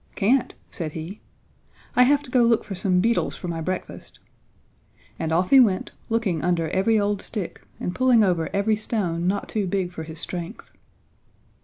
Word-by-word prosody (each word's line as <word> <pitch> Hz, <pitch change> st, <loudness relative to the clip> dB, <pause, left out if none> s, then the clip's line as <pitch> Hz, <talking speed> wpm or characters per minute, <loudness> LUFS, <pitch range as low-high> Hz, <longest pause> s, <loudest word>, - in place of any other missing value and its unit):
"Can't," 235 Hz, +6 st, +2 dB, 0.2 s
said 155 Hz, -4 st, -5 dB
he. 165 Hz, +6 st, -7 dB, 0.7 s
"I -, -, +5 dB
have 285 Hz, +3 st, +4 dB
to 255 Hz, -, -11 dB
go 250 Hz, -, +4 dB
look 235 Hz, -1 st, +3 dB
for 200 Hz, -, -7 dB
some 180 Hz, -1 st, +1 dB
beetles 230 Hz, +3 st, +1 dB
for 180 Hz, -, -7 dB
my 165 Hz, -1 st, -3 dB
breakfast," 185 Hz, +3 st, -5 dB, 1.0 s
and 160 Hz, -, -2 dB
off 180 Hz, +3 st, +1 dB
he 270 Hz, -, +9 dB
went 205 Hz, -7 st, +3 dB, 0.2 s
looking 220 Hz, -8 st, 0 dB
under 170 Hz, -2 st, 0 dB
every 215 Hz, +4 st, +2 dB
old 205 Hz, -1 st, 0 dB
stick 205 Hz, -6 st, -5 dB, 0.2 s
and 180 Hz, -, -3 dB
pulling 250 Hz, -2 st, +4 dB
over 175 Hz, -4 st, +1 dB
every 210 Hz, +2 st, +1 dB
stone 180 Hz, -6 st, -2 dB
not 200 Hz, +2 st, -1 dB
too 210 Hz, -3 st, -2 dB
big 185 Hz, -1 st, -1 dB
for 170 Hz, -, -7 dB
his 160 Hz, 0 st, -8 dB
strength. 175 Hz, +4 st, -6 dB
195 Hz, 175 wpm, -24 LUFS, 175-225 Hz, 1.0 s, he